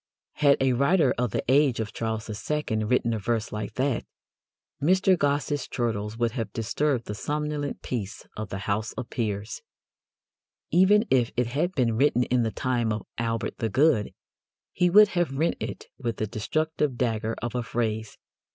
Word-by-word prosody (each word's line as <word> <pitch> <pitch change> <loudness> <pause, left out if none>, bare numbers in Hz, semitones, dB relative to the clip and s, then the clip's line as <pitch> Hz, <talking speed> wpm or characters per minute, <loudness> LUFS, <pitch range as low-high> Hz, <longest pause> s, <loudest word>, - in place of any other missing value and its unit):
Had 145 -2 +5
a 130 -1 +3
writer 140 +3 +3
of 125 -1 +1
the - - -2
age 135 -1 +4
of 110 -2 -3
Charles 110 -1 -3 0.2
II. 130 -8 0
written 115 0 +1
a 110 - -2
verse 115 +1 -1
like 105 0 -5
that, 130 -1 0 0.8
Mr. 185 +4 +4
Gosse's 145 -2 0
chortles 110 -3 -2
would 120 -1 +1
have 115 -4 -4
disturbed 120 +2 0
the 105 - -4
somnolent 150 +4 -3
peace 105 -6 -4
of 110 -2 -5
the 95 - -4
House 105 +2 -1
of 125 - -6
Peers. 105 -4 -3 1.1
Even 195 +6 +5
if 125 -3 +4
it 125 - +3
had 150 +10 -1
been 120 -4 +2
written 130 -2 +3
in 125 0 +1
the 115 - +1
time 120 -1 -1
of 105 -1 -3
Albert 115 0 -2
the 115 - 0
Good, 130 -2 +3 0.6
he 180 0 +2
would 210 +3 +7
have 175 -7 -1
rent 160 +4 +1
it - - -5
with 115 -5 -3
the 110 - -1
destructive 150 +6 -1
dagger 115 -2 -1
of 120 +1 -4
a 125 - -1
phrase. 110 -2 -2
120 Hz, 170 wpm, -26 LUFS, 110-145 Hz, 1.1 s, would